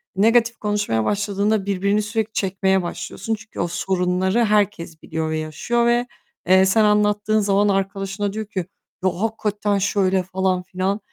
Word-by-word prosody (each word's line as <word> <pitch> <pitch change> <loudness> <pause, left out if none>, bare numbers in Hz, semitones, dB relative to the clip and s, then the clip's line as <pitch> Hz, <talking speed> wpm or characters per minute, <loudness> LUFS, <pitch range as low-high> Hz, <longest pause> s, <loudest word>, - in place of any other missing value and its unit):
Negatif 230 +3 +3
konuşmaya 205 - 0
başladığında 205 0 0
birbirini 200 +1 +1
sürekli 220 +1 -2
çekmeye 190 -1 +1
başlıyorsun. 200 +5 -4
Çünkü 220 0 -12
o 175 - 0
sorunları 185 +4 0
herkes 205 -6 0
biliyor 160 -1 -3
ve 155 - -1
yaşıyor 160 +10 -1
ve, 240 +1 +2 0.4
eee, 190 +1 +6
sen 215 +3 +3
anlattığın 210 0 +2
zaman 205 0 +2
arkadaşına 195 +1 -2
diyor 220 0 -4
ki 190 -4 -4 0.4
"Ya, 185 - +4
hakikaten 210 -2 -1
şöyle..." 195 -1 +1
falan 185 0 -1
filan. 185 +3 -2
200 Hz, 145 wpm, -21 LUFS, 190-210 Hz, 0.4 s, eee